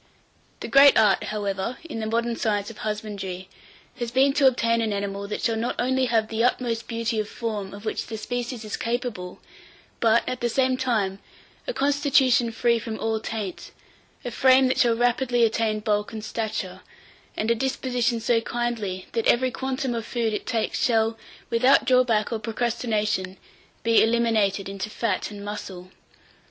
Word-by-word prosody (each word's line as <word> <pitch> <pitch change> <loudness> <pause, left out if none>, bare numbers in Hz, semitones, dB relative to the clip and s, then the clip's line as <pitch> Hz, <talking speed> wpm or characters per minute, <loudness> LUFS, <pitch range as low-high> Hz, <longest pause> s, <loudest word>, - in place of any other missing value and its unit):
The - - -4
great 275 +1 +7
art, 200 -3 +4
however, 205 +2 -3
in 230 - -5
the 220 - -3
modern 235 +1 0
science 210 -2 -1
of 220 - -14
husbandry 200 -4 -5 0.5
has 240 -1 -3
been 265 +3 +3
to 280 -2 +5
obtain 230 -2 +2
an 220 -1 -1
animal 200 0 -3
that 210 - -4
shall 230 -2 +1
not 230 +2 -2
only 260 +1 +1
have 225 -3 +1
the 225 +1 0
utmost 235 -2 0
beauty 230 -1 -2
of 210 -1 -3
form 210 -4 -4
of 205 +2 -10
which 215 - -3
the 220 - -5
species 240 +1 -4
is 210 - -4
capable, 230 -6 -4 0.6
but, 230 0 +4
at 255 - -3
the 240 - +1
same 260 +2 +2
time, 215 -7 -1 0.5
a - - 0
constitution 270 - +3
free 235 +1 +2
from 225 -1 -6
all 220 0 -1
taint, 215 -4 -5 0.6
a 245 - -3
frame 260 +2 +5
that - - 0
shall 235 -2 +4
rapidly 245 0 +2
attain 220 -1 0
bulk 210 0 0
and 220 -1 -6
stature, 220 -2 -4 0.6
and 220 +2 0
a - - +6
disposition 245 -1 -1
so 230 0 +2
kindly 225 -6 -3
that 230 -1 -1
every 255 +1 +3
quantum 260 0 -2
of 230 -1 -3
food 230 -1 -1
it 210 - -4
takes 225 -2 -1
shall, 225 -2 +2 0.4
without 255 +4 +4
drawback 245 -4 +3
or 225 - -2
procrastination, 215 -4 -1 0.5
be 230 0 +5
eliminated 220 -4 +2
into 195 +1 -5
fat 210 -3 -2
and 205 -1 -9
muscle. 190 -3 -7
230 Hz, 170 wpm, -25 LUFS, 210-245 Hz, 0.6 s, great